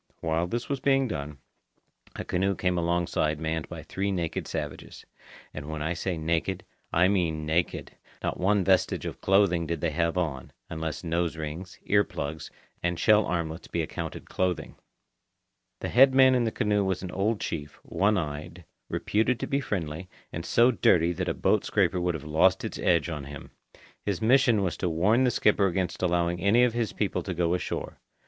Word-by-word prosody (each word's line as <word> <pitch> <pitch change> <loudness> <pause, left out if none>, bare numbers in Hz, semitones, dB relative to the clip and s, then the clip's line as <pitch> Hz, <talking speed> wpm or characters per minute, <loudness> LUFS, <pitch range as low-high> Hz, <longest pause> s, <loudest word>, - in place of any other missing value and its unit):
While 80 +1 0
this 120 +6 -3
was 140 -1 -2
being 135 0 +2
done, 75 -7 -5 0.8
a - - -5
canoe 95 +2 0
came 90 -1 0
alongside 85 -3 0
manned 80 0 -3
by - - -7
three 100 +1 -2
naked 85 -4 -2
savages. - - -6 0.5
And 75 0 -7
when 80 -1 -4
I 80 +3 -1
say 90 0 -3
naked, 85 +4 -1 0.3
I 90 +2 +4
mean 85 -6 0
naked. 80 +3 -1 0.3
Not - - -2
one 100 +2 +2
vestige 95 0 +2
of - - -6
clothing 95 -4 +3
did 85 0 -2
they 85 0 -1
have 85 +2 0
on, 75 -7 -3 0.2
unless 80 0 -4
nose 85 -1 -1
rings, 80 +4 -6
ear 100 0 +4
plugs, 75 -2 -5 0.3
and 85 0 -1
shell 110 -1 +4
armlets 85 -1 -3
be 85 - -1
accounted - - -6
clothing. 90 -2 -2 1.1
The - - -3
head 130 +2 +6
man 130 -1 +7
in 125 -2 +2
the 110 - 0
canoe 105 -4 +1
was 95 -1 -1
an 90 - -5
old 100 +3 0
chief, 75 -3 -5
one 105 +2 +1
eyed, 80 +2 -5 0.2
reputed 115 +4 0
to - - 0
be 140 - 0
friendly, 90 - -4 0.2
and 85 - -4
so 120 +7 +4
dirty 90 -6 +3
that - - -2
a - - -1
boat - - +2
scraper 90 - +1
would 90 -1 0
have 75 - -6
lost 80 +5 +2
its - - -5
edge 85 -2 +2
on 75 -5 -5
him. 70 -1 -10 0.5
His 100 -4 -1
mission 120 -2 +4
was 85 -4 -2
to 90 - -1
warn 105 +10 +3
the - - +4
skipper 105 -3 +3
against 90 0 -2
allowing 85 -1 +1
any 105 +6 +4
of 125 -2 +2
his 115 -3 -1
people 105 - -1
to 95 - -5
go 85 0 +1
ashore. 90 - -4
90 Hz, 185 wpm, -27 LUFS, 80-100 Hz, 1.1 s, man